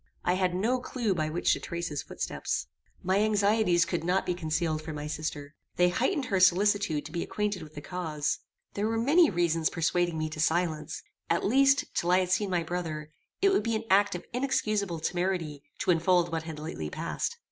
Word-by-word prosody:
I 180 - +3
had 185 -1 +1
no 235 +7 +1
clue 240 -4 -1
by 155 -3 -1
which 165 +3 +2
to - - -2
trace 170 0 -4
his 145 -2 -3
footsteps. - - -3 0.4
My 190 +2 +2
anxieties 205 -4 +3
could 175 -3 -2
not 180 +3 +1
be 180 - 0
concealed 160 -1 -1
from 155 -1 -6
my 150 0 -5
sister. 150 -1 -4 0.2
They 180 0 +4
heightened 285 - 0
her 200 -6 0
solicitude 185 -3 +3
to 155 - -8
be 170 0 -2
acquainted 210 -3 -2
with 155 -1 -11
the 150 - -6
cause. 155 -4 -2 0.3
There 205 +1 -1
were 225 0 0
many 295 +8 +5
reasons 165 -2 +1
persuading 170 0 0
me 155 0 -1
to 155 - -7
silence: 160 -2 0 0.3
at 170 - +1
least, 275 +5 +4
till 170 - -1
I 180 - +5
had 180 -1 -2
seen 205 +1 +1
my 175 -2 +1
brother, 160 -3 -4 0.3
it 395 - +6
would 390 - +3
be 230 -1 -1
an 220 - -2
act 200 0 +4
of 175 - -7
inexcusable 215 - 0
temerity 175 -4 -1 0.2
to - - +1
unfold 175 0 +3
what 160 -1 -2
had 160 -2 -6
lately 150 - -5
passed. - - -3
175 Hz, 200 wpm, -29 LUFS, 160-205 Hz, 0.4 s, it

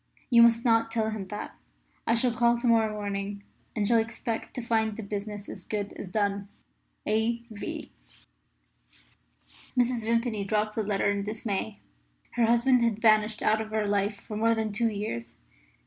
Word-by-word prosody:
You 235 -1 +8
must 235 0 +5
not 225 -1 +4
tell 220 -1 0
him 205 -3 -5
that. 210 +2 -6 0.5
I 230 - +4
shall 240 0 +2
call 235 0 +3
to 240 - -4
morrow 225 -2 +4
morning, 200 -1 -4 0.3
and 210 -3 +1
shall 230 0 +5
expect 225 +1 -3
to 245 - -3
find 220 -2 +1
the 225 - -5
business 205 0 -5
as - - -8
good 205 -1 -3
as 185 - -7
done. 200 0 0 0.6
"A. 225 +2 +1
V." 205 - -6 1.9
Mrs. 245 -1 +2
Vimpany 230 -2 0
dropped 215 +1 0
the 220 - -1
letter 200 -1 0
in 200 0 -1
dismay. 210 0 -3 0.5
Her 235 -2 +2
husband 240 +2 +4
had 230 -3 +2
vanished 215 -1 +3
out 220 +1 +3
of 220 - -6
her 215 -1 0
life 200 0 0
for 215 - -8
more 230 +2 +3
than 220 -1 -1
two 230 +3 +1
years. 120 - -5
220 Hz, 170 wpm, -28 LUFS, 205-230 Hz, 1.9 s, You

